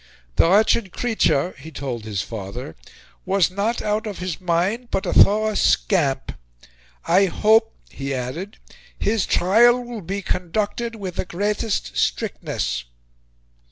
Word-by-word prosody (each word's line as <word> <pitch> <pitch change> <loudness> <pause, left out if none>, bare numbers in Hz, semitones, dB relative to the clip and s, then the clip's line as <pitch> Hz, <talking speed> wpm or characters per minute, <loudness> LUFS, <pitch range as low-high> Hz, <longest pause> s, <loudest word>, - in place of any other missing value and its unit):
"The 165 - +4
wretched 210 0 +3
creature," 180 - +1
he 160 - -10
told 130 -7 -5
his 105 -2 -2
father, 105 -3 -7 0.5
was 190 -2 +2
"not 210 +5 -1
out 210 +1 -1
of 205 - -5
his 180 -2 -5
mind, 185 +8 0
but 195 - -2
a 175 - -1
thorough 215 +1 +5
scamp." 155 -10 +1 0.7
"I 190 +4 +4
hope," 220 +5 +3
he 140 0 -6
added, 135 - -4 0.4
"his 215 0 0
trial 235 +7 +4
will 240 -3 -7
be 195 +3 -4
conducted 210 +6 -2
with 190 -5 -6
the - - -1
greatest 200 - -2
strictness." - - -2
190 Hz, 130 wpm, -22 LUFS, 145-215 Hz, 0.7 s, thorough